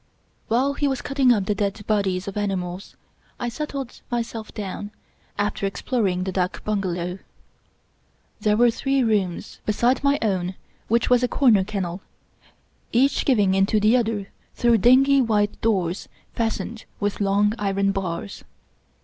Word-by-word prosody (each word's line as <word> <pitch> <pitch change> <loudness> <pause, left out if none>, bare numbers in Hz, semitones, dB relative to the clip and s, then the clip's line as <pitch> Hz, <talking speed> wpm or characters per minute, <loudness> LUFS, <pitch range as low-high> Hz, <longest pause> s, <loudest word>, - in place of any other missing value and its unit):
While 260 +5 +2
he 285 0 0
was 265 -2 -2
cutting 275 -3 +3
up 205 -5 +2
the 210 - +1
dead 205 0 -2
bodies 195 -3 0
of 200 - -5
animals, 190 -3 -3 0.4
I 240 - -2
settled 275 0 -5
myself 230 -2 -4
down, 205 0 -5 0.5
after 205 -1 -1
exploring 195 -2 -1
the 190 - -3
dak 185 0 -2
bungalow. 185 -3 -2 1.2
There 210 0 +2
were 240 0 +5
three 270 +3 0
rooms, 200 -6 -1
beside 240 +6 +1
my 280 0 +3
own, 185 -3 -1 0.3
which 235 +2 +1
was 245 -1 +5
a 250 - +2
cor 260 0 +3
ner 200 -3 +4
kennel, 190 -3 -4 0.9
each 270 +4 +2
giving 205 -8 +3
into 195 +3 +3
the 215 +3 +4
other 220 -5 0 0.3
through 235 -2 +3
dingy 270 +5 +5
white 210 -4 0
doors 190 -5 0 0.2
fastened 225 0 -3
with 205 0 -2
long 200 +1 +2
iron 195 -1 +1
bars. 195 0 -4
210 Hz, 145 wpm, -23 LUFS, 195-240 Hz, 1.2 s, were